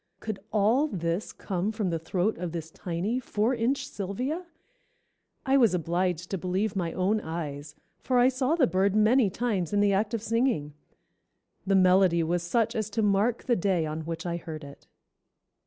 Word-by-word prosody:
Could 215 -3 -5
all 225 +8 +3
this 170 - -2
come 190 +1 -3
from 210 -5 -2
the 165 - -1
throat 180 +6 -1
of 175 -2 -4
this 165 -1 -5
tiny, 185 +10 -2
four 230 0 0
inch 265 +4 0
Sylvia? 255 - -4 1.0
I 270 0 +4
was 230 -8 +4
obliged 175 +1 -1
to 195 - -2
believe 190 +4 -1
my 175 -3 -1
own 195 +4 +1
eyes, 150 -3 -6 0.2
for 255 - 0
I 245 +1 +6
saw 260 +3 +1
the 310 -6 +4
bird 195 -2 +1
many 215 +1 +4
times 205 -4 -2
in 205 - +3
the 205 -1 +3
act 210 +3 0
of 225 - -4
singing. 230 - 0 0.9
The 195 - +3
melody 185 -2 +4
was 175 +2 0
such 230 +6 0
as 215 -1 -2
to 220 +1 -1
mark 210 +4 +2
the 240 - +2
day 180 -4 +1
on 155 +1 -4
which 165 +1 -5
I 170 -1 -2
heard 160 -2 -7
it." 140 0 -13
195 Hz, 180 wpm, -27 LUFS, 170-230 Hz, 1.0 s, I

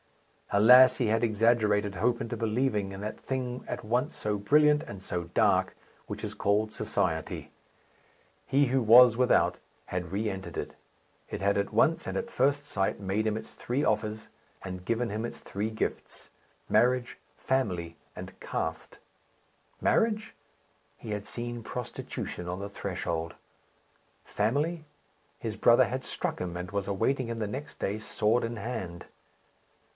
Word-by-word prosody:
Alas! 125 +5 +8
he 120 - +1
had 110 +2 +1
exaggerated 105 -2 +2
hope 120 +2 +1
into 115 +1 -3
believing 110 -2 0
in 95 - -7
that 105 +1 -4
thing 125 -2 -3
at - - -5
once 120 +4 0
so 105 -1 -1
brilliant 150 +8 +4
and 100 - -9
so 90 -2 -3
dark - - +3 0.3
which - - -6
is - - -5
called 105 +2 +1
Society. 90 -7 -2 1.0
He 140 +1 +4
who 130 0 +1
was 120 +1 +8
without 125 +1 +3 0.3
had 90 -1 -4
re 105 +3 -1
entered 95 -2 -5
it. - - -4 0.6
It - - -5
had 100 +1 +2
at 100 0 -1
once, 165 0 +3
and - - -3
at 235 0 -4
first 140 - +1
sight, 95 -6 -1
made 100 +2 -1
him 110 0 0
its 110 - -9
three 130 +4 -2
offers, 110 0 -1 0.3
and 90 -1 -7
given 115 +4 0
him 105 +2 -3
its 120 - -5
three 105 +2 -3
gifts 110 - -5 0.4
marriage, 125 0 +2 0.2
family, 90 -11 -1 0.2
and - - -9
caste. - - -4 0.8
Marriage? 215 -1 +1 0.6
He 110 - -8
had 105 0 -4
seen 120 0 -5
prostitution 110 -7 -5
on 90 +1 -3
the 100 +1 -5
threshold. 85 -4 -3 0.9
Family? 145 +10 0 0.6
His - - -4
brother - - +5
had - - -3
struck - - -3
him, 90 -1 -4
and 90 +1 -6
was 100 -1 -2
awaiting 115 +6 0
him 115 0 -4
the 105 - -1
next 135 +8 -6
day, 105 +2 -1
sword 110 +2 +1
in 115 0 -3
hand. 100 -6 -5
110 Hz, 150 wpm, -29 LUFS, 100-125 Hz, 1.0 s, Alas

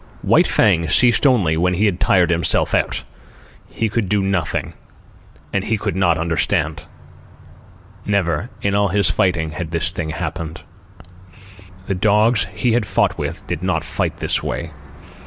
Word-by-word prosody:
White - - +4
Fang 85 0 +2
ceased 120 - +4
only 100 -12 +2
when 90 +2 +1
he 105 +5 +1
had 95 -4 0
tired 90 -2 +3
himself 85 -2 +2
out. - - 0 0.7
He 115 - -2
could 105 -2 -2
do 105 -1 +1
nothing, 95 -4 -2 0.8
and 100 - 0
he 110 - -1
could - - -3
not 90 -4 +2
understand. 80 -1 -1 1.2
Never, 100 -1 -1
in 100 - +1
all 100 0 +2
his 100 -1 +2
fighting, 85 -4 0
had 80 +1 -5
this 85 0 0
thing 85 -2 -4
happened. 80 0 -5 1.2
The 100 - -2
dogs 105 +4 +2
he 125 - 0
had 115 -3 +1
fought - - 0
with - - -5
did 85 -2 -4
not 90 -4 -1
fight - - -3
that - - 0
way. 85 -1 -4
90 Hz, 155 wpm, -19 LUFS, 80-100 Hz, 1.2 s, White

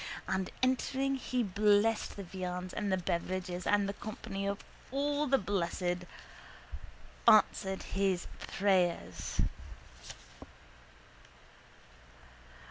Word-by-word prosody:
And 190 -1 -1
entering 265 +1 +1
he 255 -1 -1
blessed 210 +2 +3
the 200 - -6
viands 180 0 -5
and 205 -2 -1
the 190 - +3
beverages 180 0 -2
and 205 -1 +3
the 200 - -2
company 205 -2 -5
of 200 0 -1 0.3
all 290 +2 0
the 270 0 +4
blessed 180 -3 -1 1.2
answered 190 0 +5
his 195 -2 0
prayers. 190 -3 0
195 Hz, 90 wpm, -33 LUFS, 185-215 Hz, 1.2 s, answered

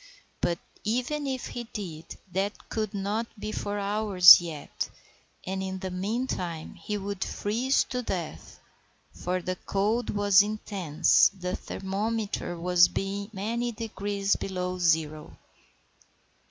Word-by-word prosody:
But, 170 -1 +1 0.3
even 255 +6 -1
if 260 -2 -3
he 240 -1 -6
did, 175 -8 -7
that 195 +3 -3
could 215 -3 -2
not 205 +4 -1
be 215 - -4
for 205 -1 -3
hours 200 -3 +8
yet, 160 -4 -5 0.6
and 190 +1 -3
in 190 0 -3
the 185 -1 -5
meantime 185 -4 -3
he 210 - -4
would 200 -1 -3
freeze 240 +6 +1
to 250 -1 -2
death; 180 -8 -5 0.5
for 180 0 -2
the 185 +1 -2
cold 215 +6 0
was 205 -1 +5
intense, 200 -7 +3
the 180 -2 -4
thermometer 200 -1 -3 0.3
being 200 +1 -3
many 230 +4 -2
degrees 205 -2 -1
below 185 -1 -3
zero. 160 -3 0
200 Hz, 120 wpm, -28 LUFS, 185-215 Hz, 0.6 s, hours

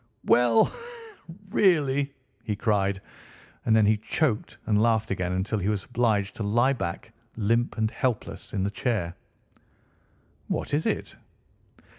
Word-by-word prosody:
"Well, 115 -1 +4 0.8
really!" 145 -9 +2 0.3
he 110 -2 -2
cried, 100 -2 0 0.6
and 110 - +3
then 110 -1 +5
he 105 +1 +4
choked 110 -1 -1
and 105 -1 +2
laughed 110 -1 +2
again 90 -2 -1
until 95 +4 -1
he 95 +2 0
was 105 -3 -1
obliged 110 -5 0
to - - -6
lie 120 +6 +3
back, 85 -9 -5 0.2
limp 115 +3 +1
and 110 0 +1
helpless, 105 -6 -3
in 95 -3 -1
the 100 - -1
chair. 105 -6 -1 1.3
"What - - -3
is 150 +2 +1
it?" - - -3
110 Hz, 135 wpm, -26 LUFS, 100-120 Hz, 1.3 s, then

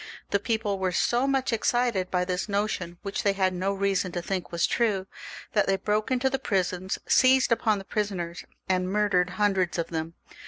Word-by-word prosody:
The 200 - +3
people 215 -2 -1
were 185 -1 0
so 240 +8 +1
much 265 -3 +1
excited 230 -4 +1
by 180 -1 0
this 180 +3 -2
notion, 200 -4 -2
which 200 -1 -2
they 200 - +2
had 190 -1 +1
no 185 +2 -1
reason 195 -2 0
to 175 - -2
think 185 -1 -3
was 170 -1 +1
true, 210 -5 +1 0.5
that 210 - +2
they 195 0 +2
broke 210 +2 -1
into 255 0 +1
the 270 0 0
prisons, 185 -4 -1
seized 260 -1 +4
upon 220 -2 +2
the 195 - -8
prisoners, 185 -6 -3 0.2
and 185 0 0
murdered 195 -3 +2
hundreds 195 -5 +1
of 170 - -2
them. 165 0 -4
195 Hz, 190 wpm, -27 LUFS, 180-215 Hz, 0.5 s, seized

